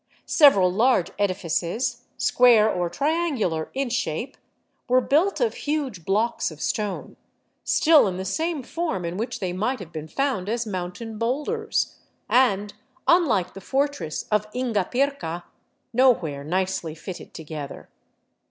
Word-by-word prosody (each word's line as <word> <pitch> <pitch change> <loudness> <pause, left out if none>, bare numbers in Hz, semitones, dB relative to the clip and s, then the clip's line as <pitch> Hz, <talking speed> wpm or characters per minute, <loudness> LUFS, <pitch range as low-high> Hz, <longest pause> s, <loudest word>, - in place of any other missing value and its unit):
Several 200 - +6
large 220 -1 +2
edifices, 200 +5 -1
square 235 -4 +5
or 180 -5 0
triangular 280 - 0
in 270 -2 -1
shape, 235 - -2 0.5
were 255 +1 +5
built 310 +10 +2
of 475 -3 +1
huge 275 - -3
blocks 215 +5 +1
of 155 -2 -12
stone, 205 +3 -3 0.5
still 315 -7 +5
in 185 -1 -3
the 190 - -4
same 315 - -1
form 280 - -3
in 170 +1 -3
vi^hich 225 +4 -3
they 180 -2 -3
might 220 +8 -1
have 185 -7 -10
been 155 -1 -6
found 250 - -1
as 235 +1 -1
mountain 205 +3 -5
boulders, 300 - -1 0.3
and, 210 -5 +2 0.3
unlike 235 - +3
the 195 - -9
fortress 270 - -1
of 210 0 +1
Ingapirca, 245 -5 -1 0.5
no 260 +3 +6
where 150 -10 -4
nicely 175 -1 -2
fitted 175 +3 -9
together. 155 -3 -7
215 Hz, 135 wpm, -24 LUFS, 180-265 Hz, 0.5 s, Several